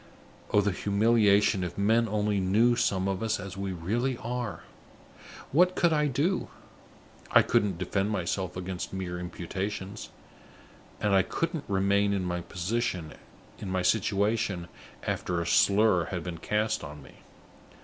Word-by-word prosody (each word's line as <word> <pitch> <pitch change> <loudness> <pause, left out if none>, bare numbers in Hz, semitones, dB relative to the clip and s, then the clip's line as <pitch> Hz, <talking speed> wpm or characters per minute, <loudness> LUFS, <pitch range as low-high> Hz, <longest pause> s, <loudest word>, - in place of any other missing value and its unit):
Oh, 105 - +4
the 100 0 +1
humiliation 105 -1 +3
if 90 - -5
men 110 +3 +3
only 105 -1 0
knew 110 +6 +3
some 95 -4 +1
of 95 -1 -2
us 110 -1 0
as 95 -1 -7
we 100 0 -3
really 115 +9 -1
are! 125 -2 -4 0.9
What 180 +5 +4
could 170 -2 +3
I 150 -1 +2
do? 150 +8 0 0.8
I - - +6
couldn't 100 -4 +1
defend 95 +3 -1
myself 95 -2 -2
against 90 0 -5
mere 90 -2 -4
imputations; 95 +3 -5 0.9
and 105 -1 +1
I 95 - +6
couldn't 165 - -3
remain 100 +1 +2
in 95 -2 -1
my 90 0 -4
situation 100 -2 +1 0.4
after 90 -1 -1
a 85 - -2
slur 100 0 +4
had 90 -3 -4
been 85 -2 -6
cast 105 +2 -1
on 75 -1 -9
me. - - -16
100 Hz, 135 wpm, -28 LUFS, 90-110 Hz, 0.9 s, I